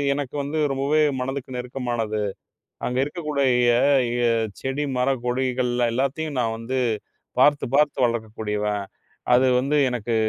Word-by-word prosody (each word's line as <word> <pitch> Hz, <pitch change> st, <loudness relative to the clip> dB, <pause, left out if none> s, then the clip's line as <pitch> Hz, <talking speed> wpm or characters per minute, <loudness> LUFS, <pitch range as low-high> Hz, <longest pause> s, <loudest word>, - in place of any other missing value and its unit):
எனக்கு 145 Hz, -1 st, -4 dB
வந்து 155 Hz, +3 st, -2 dB
ரொம்பவே 140 Hz, +3 st, +2 dB, 0.2 s
மனதுக்கு 130 Hz, 0 st, -4 dB
நெருக்கமானது. 120 Hz, -4 st, -2 dB, 0.6 s
அங்க 125 Hz, +1 st, -1 dB
இருக்கக்கூடிய 150 Hz, -3 st, -1 dB, 0.7 s
ய 120 Hz, -, +1 dB, 0.4 s
செடி, 135 Hz, +2 st, -2 dB
மர, 135 Hz, +2 st, +2 dB
கொடிகள்ல 125 Hz, -1 st, 0 dB
எல்லாத்தையும் 140 Hz, +3 st, -1 dB
நான் 115 Hz, -1 st, -1 dB
வந்து 130 Hz, +3 st, -2 dB, 0.6 s
பார்த்துப் 145 Hz, -3 st, +3 dB
பார்த்து 145 Hz, -4 st, +3 dB
வளர்க்கக்கூடியவன். 105 Hz, -3 st, -2 dB, 0.5 s
அது 130 Hz, +1 st, +5 dB
வந்து 140 Hz, +4 st, +1 dB
எனக்கு 120 Hz, -2 st, -2 dB
130 Hz, 115 wpm, -23 LUFS, 120-140 Hz, 0.7 s, அது